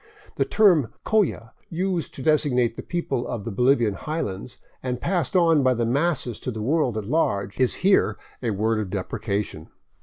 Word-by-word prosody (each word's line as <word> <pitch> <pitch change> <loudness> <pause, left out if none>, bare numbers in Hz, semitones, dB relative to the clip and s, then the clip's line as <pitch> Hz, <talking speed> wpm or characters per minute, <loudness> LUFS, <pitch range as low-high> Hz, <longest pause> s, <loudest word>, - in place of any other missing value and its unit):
The - - +2
term 180 - +4
" - - -46
CoUa," 185 - +1 0.2
used 175 -1 -2
to 135 - -7
designate 125 -6 +2
the - - -6
people 140 -8 -3
of 115 -4 -4
the 115 - -4
Bolivian 120 0 +3
highlands, 120 -4 -5 0.2
and 125 -1 -3
passed 175 0 -1
on 165 -4 +5
by 130 -1 +3
the 120 0 0
masses 130 -2 0
to - - -5
the 110 -3 -5
world 135 -3 +1
at 105 - -3
large, 100 -7 0
is 130 -1 +3
here 195 0 +4 0.2
a 120 - -1
word 110 +2 0
of 105 -3 -3
deprecation. 100 -3 -3
125 Hz, 180 wpm, -24 LUFS, 110-160 Hz, 0.2 s, on